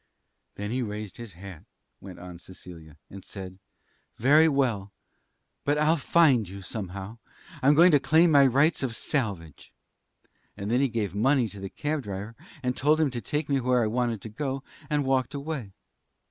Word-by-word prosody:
"Then 105 +1 -5
he 130 +2 -1
raised 105 -3 -6
his 115 -5 -9
hat," 90 -1 -11 0.4
went 95 -2 -11
on 90 -1 -10
Cecilia, 85 -4 -13
"and 100 -1 -10
said: 95 -1 -9 0.6
'Very 150 +6 +5
well. 120 -9 0 0.7
But 145 +1 +1
I'll 150 +2 +3
find 140 - +3
you, 100 0 -9
anyhow. 100 +1 -6 0.4
I'm 145 +3 +5
going 175 +4 +7
to 145 - +5
claim 160 +4 +4
my 140 -2 +6
rights 140 +6 +2
of 125 -4 -2
salvage.' 100 - -3 0.8
Then 100 +2 -5
he 130 +3 +2
gave 110 -6 -2
money 125 +4 +2
to 100 - -10
the 95 0 -6
cab 150 +5 -3
driver 105 0 -7 0.3
and 125 0 -1
told 150 +3 +2
him 155 -4 +2
to 120 -1 -5
take 150 +3 -2
me 140 -1 +1
where 125 -1 +2
I - - +1
wanted 115 -1 -1
to 110 - -8
go, 135 +4 -4 0.3
and 145 -2 0
walked 130 0 0
away. 140 -7 -5
120 Hz, 175 wpm, -27 LUFS, 100-140 Hz, 0.8 s, going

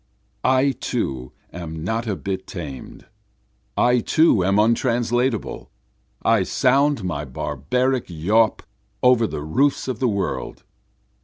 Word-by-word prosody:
I 130 +2 +3
too 65 - -3 0.2
am 80 -2 -6
not 110 +5 -2
a 105 - -1
bit 95 0 -5
tamed, 75 -8 -8 0.7
I 125 0 +4
too 135 - +3
am 100 +2 +2
untranslatable, 115 +1 0 0.5
I 115 -3 +4
sound 135 +4 +2
my 75 -5 -3
barbaric 75 - -1
yawp 105 +7 +1 0.4
over 125 -3 +5
the 75 - -5
roofs 135 - +1
of 130 -4 -3
the 130 - +2
world. 100 -3 -3
110 Hz, 115 wpm, -22 LUFS, 85-125 Hz, 0.7 s, over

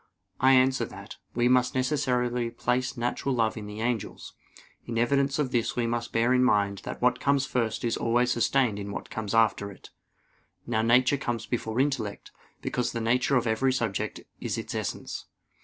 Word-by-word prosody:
I 130 +1 +5
answer 130 0 +4
that, - - -10 0.2
We 120 0 +3
must 125 0 +3
necessarily 125 -3 0
place 125 +2 -1
natural 120 +3 -1
love 110 -2 +1
in 105 -2 -7
the 105 +1 -7
angels. 120 -2 -3 0.5
In 115 - -3
evidence 135 +4 +2
of 145 -4 0
this 120 -2 0
we 120 - 0
must 115 0 -2
bear 115 +2 +2
in 125 0 +4
mind 100 -4 +2
that - - -6
what 125 0 +3
comes 140 -1 +2
first 115 -4 -1
is 115 -1 0
always 120 +2 +2
sustained 120 -2 +2
in 100 0 -5
what - - -7
comes 110 -1 -3
after 110 -2 +3
it. 95 - -14 0.7
Now 110 - 0
nature 125 +4 +4
comes 120 -4 -3
before 115 -1 -2
intellect, 130 -7 -1 0.3
because 125 - -1
the 115 - -2
nature 125 +4 +2
of 125 -2 +2
every 120 +4 +2
subject 115 -6 -2 0.2
is - - -3
its - - -5
essence. - - -4
120 Hz, 180 wpm, -27 LUFS, 115-130 Hz, 0.7 s, I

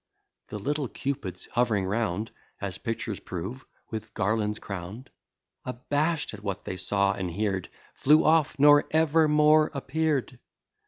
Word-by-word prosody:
The 105 - -6
little 145 +6 -2
Cupids 110 -10 -4
hov'ring 110 -6 +2
round, 105 +1 -1 0.3
(As 95 -1 -5
pictures 115 -2 -3
prove) 95 +9 -6 0.2
with 110 -1 -6
garlands 105 +1 0
crown'd, 100 +7 -7 0.5
Abash'd 145 +5 -1
at 105 - -9
what 100 -1 -4
they - - -4
saw 100 +1 +2
and 95 -2 -5
heard, 95 -5 -1 0.2
Flew 150 +3 +4
off, 155 -2 +3
nor 145 +1 +6
ever 160 0 +3
more 150 +1 +5
appear'd. 140 -2 -1
115 Hz, 130 wpm, -27 LUFS, 100-145 Hz, 0.5 s, nor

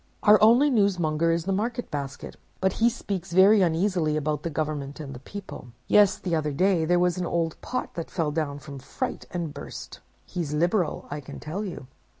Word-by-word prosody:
Our 210 0 +7
only 240 +7 +6
newsmonger 170 -7 +2
is 165 0 -1
the 195 - -1
Market 230 +5 -2
Basket; 140 -2 -5 0.2
but 190 0 +1
he 230 +1 +3
speaks 195 -7 -5
very 195 +3 +7
uneasily 170 -2 +1
about 150 -1 -1
the 170 - -3
government 150 -2 -3
and 140 -3 -6
the 125 - -8
people. 135 -6 -9
Yes, 205 -2 +5
the 180 - -4
other 155 -2 0
day 180 +2 +2
there 175 +2 +3
was 180 0 +1
an 175 - -1
old 165 -2 -1
pot 255 - -4
that 165 - -5
fell 160 -4 -1
down, 145 -2 -2
from 140 -1 -9
fright, 135 - -5
and 170 -4 -4
burst. 140 - -8 0.3
He's 165 -5 -3
liberal, 175 +1 +1
I 145 - -3
can 140 - -9
tell 170 +8 -4
you! 180 -9 -6
170 Hz, 195 wpm, -26 LUFS, 150-195 Hz, 0.3 s, Our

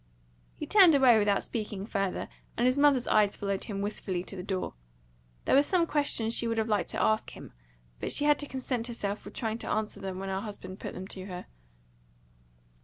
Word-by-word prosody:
He - - -5
turned 375 -7 +7
away 255 -5 +6
without 205 -1 +2
speaking 210 -3 -4
further; 195 -3 -2 0.3
and 240 - +2
his 255 0 +4
mother's 285 -3 +4
eyes 205 -1 +3
followed 200 -1 -2
him 200 -3 -4
wistfully 190 -3 -2
to 195 - -7
the 180 - -5
door. 190 0 -3 0.7
There - - +2
were 275 - +7
some 340 +3 +2
questions 285 -8 0
that - - +4
she 235 - 0
would 230 0 -1
have 220 0 +1
liked 210 -2 0
to - - -3
ask 215 0 +2
him; - - -11 0.5
but - - -3
she 290 - +2
had 295 -1 +4
to 290 - -2
content 255 -3 -3
herself 210 -4 -4
with - - -10
trying 225 -2 -2
to - - -5
answer 215 -1 -2
them 190 -2 -5
when 195 +1 -4
her 190 0 -2
husband 205 -3 -8
put - - -6
them 185 - -6
to 190 -1 -7
her. 180 -2 -7
215 Hz, 215 wpm, -29 LUFS, 195-255 Hz, 0.7 s, turned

